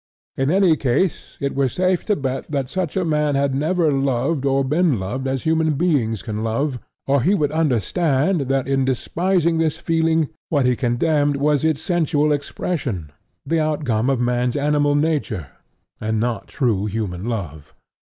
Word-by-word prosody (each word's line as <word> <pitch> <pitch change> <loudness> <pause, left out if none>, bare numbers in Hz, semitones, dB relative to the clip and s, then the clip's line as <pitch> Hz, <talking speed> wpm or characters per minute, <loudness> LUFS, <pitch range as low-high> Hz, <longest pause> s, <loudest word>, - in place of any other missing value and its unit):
In 135 +1 0
any 185 -1 +4
case 140 +6 -1
it 140 -1 -2
were 135 -1 +1
safe 185 +5 0
to 210 - +2
bet 135 -3 -3
that 140 -4 -2
such 185 -3 -2
a 185 - +1
man 150 -2 +1
had 140 0 +1
never 160 +3 +1
loved 135 +1 0
or 135 0 +2
been 150 - +1
loved 130 +8 -3
as 130 -1 -2
human 160 -1 +2
beings 135 - 0
can 110 0 -4
love, 125 +4 -1 0.3
or 140 -1 +2
he 185 +10 +3
would 150 -5 0
have 155 - -1
understood 145 - +1
that 135 -1 0
in 135 -1 +1
despising 170 +6 0
this 160 -2 +1
feeling, 160 -2 +1 0.2
what 145 -5 +2
he 125 0 +3
condemned 145 +4 +1
was 145 +1 +1
its 160 -2 +1
sensual 155 -3 +1
expression, 140 - -3 0.3
the 165 0 +1
outcome 140 -7 0
of 135 -3 +1
man's 125 0 0
animal 145 0 +2
nature, 145 - -1 0.5
and 110 0 -1
not 120 0 -2
true 105 -6 0
human 100 -3 -3
love. 85 - -5
140 Hz, 170 wpm, -21 LUFS, 125-160 Hz, 0.5 s, any